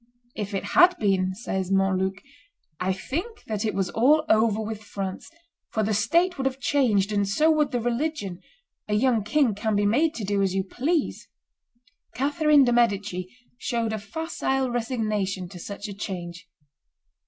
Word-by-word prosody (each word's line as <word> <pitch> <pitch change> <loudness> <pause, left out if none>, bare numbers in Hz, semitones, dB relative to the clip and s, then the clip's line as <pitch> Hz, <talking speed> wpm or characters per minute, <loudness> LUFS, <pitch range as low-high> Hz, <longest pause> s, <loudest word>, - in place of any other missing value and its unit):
"If 205 -1 -4
it 195 - -2
had 360 0 +6
been," 190 -3 +1
says 190 -3 -3
Montluc, 195 0 +1 0.6
"I 185 +1 0
think 345 - -4
that 215 -2 -3
it 220 - -1
was 190 -3 -1
all 300 +7 +4
over 220 -1 +3
with 220 -1 -4
France, 195 -2 -5 0.4
for 220 - -1
the 215 +1 0
state 335 - +2
would 265 - +1
have 265 0 -4
changed, 225 -8 +2
and 200 -1 +1
so 305 +10 +3
would 305 -2 +2
the 245 - -1
religion; 235 - -2 0.5
a 210 - 0
young 230 -1 +2
king 265 +1 +2
can 210 +1 -1
be 205 0 +2
made 295 +10 +2
to 225 - -5
do 200 0 0
as 190 -1 0
you 190 - +1
please;" 290 - -1 0.9
Catherine 295 +1 +4
de' 245 -2 +2
Medici 200 -6 +1 0.3
showed 230 -4 -1
a 220 - -2
facile 265 +2 -2
resignation 215 -6 -2
to 180 - -10
such 200 +4 -6
a 205 - -6
change. 175 -3 -6
215 Hz, 165 wpm, -25 LUFS, 195-265 Hz, 0.9 s, had